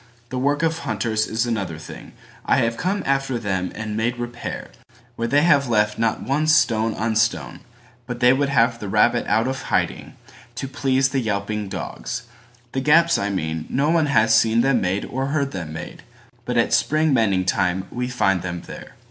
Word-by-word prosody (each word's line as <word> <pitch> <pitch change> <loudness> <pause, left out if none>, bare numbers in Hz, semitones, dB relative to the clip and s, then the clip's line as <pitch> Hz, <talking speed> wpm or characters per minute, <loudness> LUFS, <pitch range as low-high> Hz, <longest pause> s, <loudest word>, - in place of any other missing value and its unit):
The 130 - -3
work 145 +4 +1
of 165 0 0
hunters 110 -5 -1
is 115 +2 -1
another 100 -9 -3
thing:I 80 - -5
have 115 0 +1
come 190 - -1
after 135 -2 0
them 95 -5 -2
and 105 -1 -4
made 115 +3 0
repairWhere 120 0 -6 0.5
they 120 +6 +2
have 140 -6 +3
left 105 -1 +1
not 115 -1 0
one 150 +4 0
stone 115 -8 +3
on 110 +1 -1
stone, 115 +1 0 0.5
But 125 -1 -5
they 125 0 +5
would 140 +1 0
have 115 -3 +2
the 105 - -6
rabbit - - +2
out 110 +3 +2
of 130 0 -3
hiding, - - -1 0.4
To 135 +3 -4
please 135 -1 +1
the 135 - 0
yelping 105 -2 -2
dogs. - - -5 0.5
The 130 - -2
gaps 165 +4 +4
I 100 - -1
mean, 80 -5 -3
No 145 +4 +1
one 165 -3 +2
has 115 -5 +3
seen 110 +1 +4
them 135 +1 +2
made 95 +2 -1
or 135 +1 -3
heard 140 -1 -1
them 85 -5 -6
made, 80 - -8 0.4
But - - -2
at - - +2
spring 155 -1 +2
mending 100 -6 +2
time 95 0 0
we 125 0 -3
find 95 -7 +1
them 85 -1 -5
there. - - -10
115 Hz, 185 wpm, -22 LUFS, 105-135 Hz, 0.5 s, they